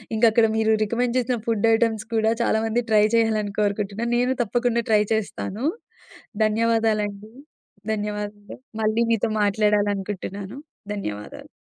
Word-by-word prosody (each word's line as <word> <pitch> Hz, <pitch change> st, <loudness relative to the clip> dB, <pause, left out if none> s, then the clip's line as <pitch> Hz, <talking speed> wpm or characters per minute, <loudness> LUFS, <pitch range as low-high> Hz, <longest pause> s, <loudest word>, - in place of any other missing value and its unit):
ఇంక 220 Hz, -, -3 dB
అక్కడ 225 Hz, -1 st, +5 dB
మీరు 220 Hz, 0 st, +3 dB
రికమెండ్ 235 Hz, +3 st, 0 dB
జేసిన 250 Hz, -1 st, 0 dB
ఫుడ్ 225 Hz, -1 st, +1 dB
ఐటెమ్స్ 225 Hz, -1 st, +1 dB
కూడా, 220 Hz, 0 st, +3 dB
చాలా 220 Hz, -2 st, +2 dB
మంది 235 Hz, +2 st, 0 dB
ట్రై 210 Hz, -1 st, +5 dB
చేయ్యాలని 215 Hz, -3 st, +1 dB
కోరుకుంటున్నాను. 210 Hz, +3 st, -1 dB
నేను 250 Hz, +1 st, +2 dB
తప్పకుండా 240 Hz, +1 st, 0 dB
ట్రై 210 Hz, -1 st, +4 dB
చేస్తాను. 220 Hz, +1 st, -3 dB, 0.8 s
ధన్యవాదాలు 220 Hz, 0 st, +2 dB
అండి. 205 Hz, +2 st, -11 dB, 0.6 s
ధన్యవాదాలు. 210 Hz, -1 st, -5 dB, 0.2 s
మళ్ళీ 220 Hz, +2 st, +2 dB
మీతో, 225 Hz, 0 st, +1 dB
మాట్లాడాలి 205 Hz, 0 st, +2 dB
అనుకుంటున్నాను. 195 Hz, +2 st, -6 dB, 0.4 s
ధన్యవాదాలు. 105 Hz, -, -6 dB
220 Hz, 130 wpm, -23 LUFS, 205-230 Hz, 0.8 s, అక్కడ